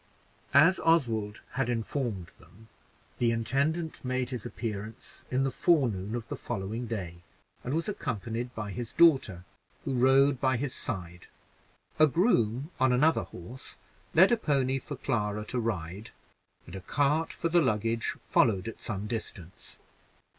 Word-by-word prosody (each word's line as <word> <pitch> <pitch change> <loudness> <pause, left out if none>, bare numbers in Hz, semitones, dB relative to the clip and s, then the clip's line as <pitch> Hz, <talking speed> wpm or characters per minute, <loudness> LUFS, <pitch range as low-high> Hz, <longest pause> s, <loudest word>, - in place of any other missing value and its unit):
As 165 +7 +7
Oswald 115 -11 +1
had 125 -1 -1
informed 115 - -2
them, 110 +3 -19 0.5
the 120 - +3
intendant 140 +8 0
made 130 0 -1
his 125 -5 -4
appearance 110 0 -6
in 130 +1 +1
the 135 - 0
forenoon 120 - +1
of 120 -1 -5
the - - -4
following 110 +5 -4
day, 95 -7 -4 0.5
and 130 +4 -2
was 165 - -1
accompanied 120 - -3
by 105 -2 -4
his 115 +4 -5
daughter, 135 - +4 0.4
who 135 - -1
rode 135 +1 +4
by 130 -2 +2
his 130 +1 -2
side. 90 -6 -4 0.7
A 155 - +8
groom, 140 - +1
on 125 -1 +3
horse, 130 - -1 0.4
led 185 +7 +7
a 240 - +4
pony 135 - +1
for 145 +3 -7
Clara 105 -5 -1
to 125 +3 -2
ride; 100 -2 -3 0.6
and 85 - -10
a 95 - -6
cart 145 - +1
for 170 - -2
the 175 +1 +4
luggage 115 -3 0
followed 100 -3 +2
at 115 - -7
some 105 -2 -3
distance. 105 -6 -5
120 Hz, 145 wpm, -29 LUFS, 105-140 Hz, 0.7 s, A